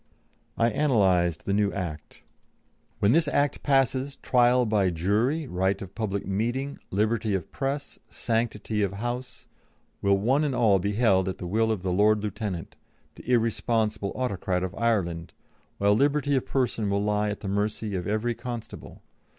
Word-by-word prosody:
I 115 +1 +3
analysed 95 - +2
the 100 - 0
new 100 0 +2
Act: 80 -6 -6 0.7
"When 100 - +3
this 165 +3 +3
Act 145 0 +1
passes, 135 0 +1
trial 125 0 +3
by 105 -4 +2
jury, 105 - 0
right 95 -3 0
of 95 -1 -9
public 100 -3 -3
meeting, 120 +8 -2
liberty 105 +1 0
of 95 - -4
press, 140 +1 -4
sanctity 110 -2 -1
of 100 -1 0
house, 120 +5 -5 0.6
will 100 0 +3
one 130 +9 +2
and 140 -4 0
all 110 -5 +4
be 100 +3 -1
held 95 -5 +3
at 95 - -5
the - - -7
will 110 +5 +1
of 100 -4 -2
the 95 - -1
Lord 105 +2 +3
Lieutenant, 105 -5 -4 0.4
the 125 - -7
irresponsible 110 -3 +1
autocrat 95 -7 -1
of 95 0 -3
Ireland, 95 -8 -1 0.4
while 100 +1 +3
liberty 145 +4 +2
of 130 - -1
person 120 -5 0
will 100 0 0
lie 105 0 +1
at 105 - -5
the 100 - -5
mercy 105 +1 -1
of 90 -1 -3
every 110 +3 0
constable. 120 -1 -8
110 Hz, 160 wpm, -26 LUFS, 100-125 Hz, 0.7 s, all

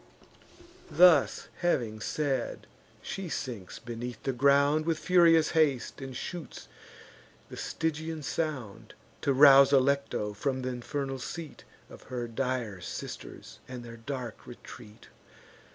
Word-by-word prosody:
Thus 160 -2 +5
having 120 -11 0
said, 135 +1 -2 0.4
she 195 -3 -5
sinks 115 - -5
beneath 120 0 -7
the 135 - -1
ground, 140 +4 +3
With 165 -1 +1
furious 165 -2 +4
haste, 145 -5 +1
and 130 -1 -6
shoots 175 -4 -7 0.8
the - - -7
Stygian 160 0 -3
sound, 135 -5 -4 0.3
To 140 - +1
rouse 140 0 +8
Alecto 140 -6 +1
from 130 +4 -2
th' 130 0 -2
infernal 135 +2 -4
seat 160 +3 -7 0.2
Of - - -13
her 120 -2 -3
dire 115 -5 -3
sisters, - - -8
and 125 -1 -7
their 115 0 -10
dark 120 -1 -6
retreat. 110 -2 -12
135 Hz, 120 wpm, -29 LUFS, 120-155 Hz, 0.8 s, rouse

